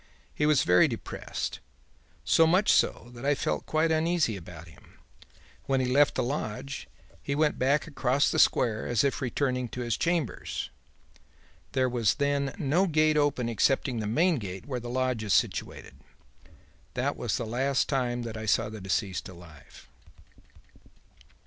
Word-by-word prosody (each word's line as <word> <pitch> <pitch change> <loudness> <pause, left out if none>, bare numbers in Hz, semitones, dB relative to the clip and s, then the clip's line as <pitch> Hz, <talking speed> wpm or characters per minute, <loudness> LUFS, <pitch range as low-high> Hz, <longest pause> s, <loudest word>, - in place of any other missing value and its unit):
He 150 - +1
was 150 -3 +4
very 90 0 +5
depressed; - - -5 0.7
so 165 - +5
much 185 +5 +4
so 120 - +1
that 120 +1 -10
I 145 +1 +2
felt - - -2
quite 155 +1 +1
uneasy 160 -6 +1
about 85 -2 -10
him. 80 - -19 0.7
When 135 -1 +2
he 130 - +1
left 140 +3 +3
the 130 - 0
lodge, 135 +1 -4 0.3
he 140 - -3
went 150 0 +1
back 140 +3 +2
across 140 -3 +1
the - - 0
square 110 -3 +2
as 120 -3 +2
if 140 0 0
returning 125 -1 -1
to 125 - -6
his 120 -3 -1
chambers. 170 -6 -2 1.0
There 130 -1 +2
was 115 -6 +1
then 140 -1 0
no 175 +3 +1
gate 155 -1 +3
open 145 -5 +1
excepting 120 +1 +1
the 105 - -3
main 165 - +2
gate 95 -3 -7
where 130 -3 -3
the 120 0 -7
lodge 130 -2 -1
is 105 - +2
situated. - - -1 1.0
That - - -1
was - - -2
the - - -3
last 130 +4 0
time 125 -3 -1
that 115 -1 -6
I 110 0 -6
saw 105 - +2
the 110 -1 -8
deceased 95 0 -2
alive.'" 85 -6 -15
130 Hz, 160 wpm, -28 LUFS, 110-145 Hz, 1.0 s, very